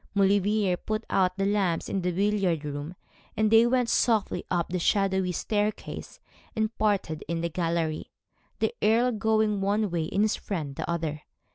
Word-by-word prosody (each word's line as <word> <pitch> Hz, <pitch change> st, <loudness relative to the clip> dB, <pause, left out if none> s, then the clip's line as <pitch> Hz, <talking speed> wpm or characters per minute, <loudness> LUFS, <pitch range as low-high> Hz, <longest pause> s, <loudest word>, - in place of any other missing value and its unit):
Maulevrier 200 Hz, -1 st, +2 dB
put 215 Hz, +4 st, -3 dB
out 185 Hz, -1 st, +2 dB
the 195 Hz, -, 0 dB
lamps 195 Hz, -5 st, 0 dB
in 195 Hz, -, -2 dB
the 180 Hz, 0 st, 0 dB
billiard 190 Hz, -4 st, 0 dB
room, 145 Hz, +4 st, -5 dB, 0.4 s
and 215 Hz, 0 st, +2 dB
then 225 Hz, -, +8 dB
they 235 Hz, -, +5 dB
went 250 Hz, -1 st, +2 dB
softly 225 Hz, -3 st, +1 dB
up 175 Hz, -2 st, 0 dB
the 180 Hz, +1 st, -1 dB
shadowy 190 Hz, 0 st, +1 dB
staircase, 210 Hz, +3 st, -3 dB, 0.4 s
and 220 Hz, +1 st, -1 dB
parted 195 Hz, -7 st, 0 dB
in 165 Hz, 0 st, -2 dB
the 170 Hz, -, -1 dB
gallery, 165 Hz, -2 st, -2 dB, 0.5 s
the -, -, 0 dB
Earl 235 Hz, +4 st, +3 dB
going 215 Hz, -2 st, +1 dB
one 205 Hz, 0 st, +1 dB
way, 165 Hz, -2 st, -1 dB
and 200 Hz, +2 st, +2 dB
his 215 Hz, -, +2 dB
friend 155 Hz, -8 st, -4 dB
the -, -, -5 dB
other. 160 Hz, -3 st, -2 dB
195 Hz, 170 wpm, -27 LUFS, 170-215 Hz, 0.5 s, then